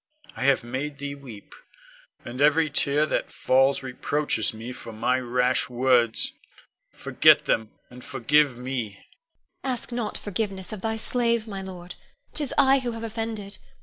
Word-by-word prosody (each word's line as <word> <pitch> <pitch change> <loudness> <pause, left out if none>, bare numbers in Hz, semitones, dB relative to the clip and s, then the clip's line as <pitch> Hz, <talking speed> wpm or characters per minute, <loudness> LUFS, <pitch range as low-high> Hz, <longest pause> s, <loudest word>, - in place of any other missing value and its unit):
I 125 - -3
have 140 -3 +4
made 135 +5 -4
thee 140 0 -4
weep, 125 -8 -11 0.7
and 125 +3 -5
every 155 +1 +4
tear 145 +1 +2
that - - -1
falls 135 +1 +3
reproaches 130 -2 0
me 115 +3 -7
for 115 - -9
my 120 +4 +1
rash 125 0 +1
words. 125 -2 +2 0.6
Forget - - +4
them, 110 -1 +1 0.2
and 125 0 -11
forgive 140 0 +2
me. 125 -4 -3
Ione. - - -22 0.6
Ask 255 -2 -3
not 235 -3 -3
forgiveness 195 -1 -4
of 210 - -7
thy 220 +1 -1
slave, 235 -1 0
my 195 -2 -5
lord. 180 -2 -8 0.4
'Tis 295 -3 -1
I 275 -1 +5
who 245 -2 -3
have 225 0 -6
offended. 225 -3 -5
145 Hz, 150 wpm, -25 LUFS, 125-210 Hz, 0.7 s, I